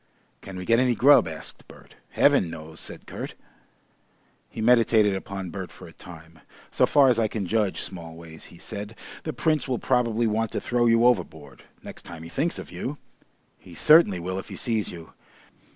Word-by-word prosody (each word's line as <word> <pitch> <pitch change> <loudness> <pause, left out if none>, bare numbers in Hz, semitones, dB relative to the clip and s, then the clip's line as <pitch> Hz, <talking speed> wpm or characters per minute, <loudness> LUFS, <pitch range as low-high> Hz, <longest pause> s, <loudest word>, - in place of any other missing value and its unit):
"Can 95 -1 -9
we 90 - -6
get 115 +3 +4
any 125 -2 +2
grub?" 140 - +6
asked 80 -1 -8
Bert. - - -16 0.2
"Heaven 85 - +3
knows!" 80 0 -9
said - - -8
Kurt. - - -7 1.1
He - - -10
meditated 110 -3 +4
upon 95 -1 -5
Bert 95 -2 -6
for 85 - -13
a 80 - -13
time. 80 -1 -13 0.3
"So - - +3
far 140 -2 +5
as 120 - +2
I 110 - +2
can 105 -2 -4
judge, 105 0 0
Smallways," 80 -3 -7
he 85 - -14
said, 105 +5 -7 0.3
"the 155 - -2
Prince 155 +2 0
will 130 -2 -1
probably 120 -3 +1
want 110 0 0
to - - -1
throw 120 -1 +1
you 115 +1 +4
overboard 80 - -1 0.2
next - - -9
time 85 -1 -10
he 80 - -9
thinks 160 - -1
of - - -9
you. 145 +3 -5 0.6
He 85 - -14
certainly 150 - +5
will 90 +2 -4
if - - -9
he - - -7
sees 110 -4 -1
you.... 85 -2 -11
105 Hz, 185 wpm, -25 LUFS, 85-120 Hz, 1.1 s, grub